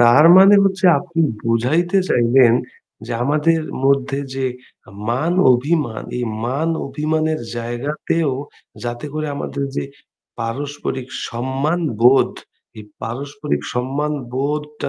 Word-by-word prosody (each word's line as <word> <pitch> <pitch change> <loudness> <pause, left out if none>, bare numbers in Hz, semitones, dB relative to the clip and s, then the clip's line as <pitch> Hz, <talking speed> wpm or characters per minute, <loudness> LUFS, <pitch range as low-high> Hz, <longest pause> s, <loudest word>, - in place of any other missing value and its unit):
তার 120 +5 +6
মানে 195 +2 +8
হচ্ছে 190 -1 +1
আপনি 170 +1 -4 0.2
বুঝাইতে 155 +12 +1
চাইবেন 120 0 +4 0.5
যে 120 - -4
আমাদের 155 +4 +2 0.2
মধ্যে 140 0 +2 0.2
যে 135 -1 -1 0.6
মান 150 +9 0 0.2
অভিমান 125 -3 0 0.2
এই 125 - -1 0.2
মান 140 +7 -1 0.2
অভিমানের 155 +1 -1 0.2
জায়গাতেও 140 +5 -2 0.5
যাতে 120 +4 -4
করে 155 0 -2
আমাদের 140 0 -3
যে, - - -1 0.5
পারস্পরিক 130 +2 -4 0.2
সম্মান 135 +8 -1 0.2
বোধ 130 +3 +5 0.5
এই 105 - -9 0.2
পারস্পরিক 140 +6 -4
সম্মান 140 +5 -1 0.2
বোধটা 150 +2 -3
140 Hz, 110 wpm, -19 LUFS, 125-155 Hz, 0.6 s, মানে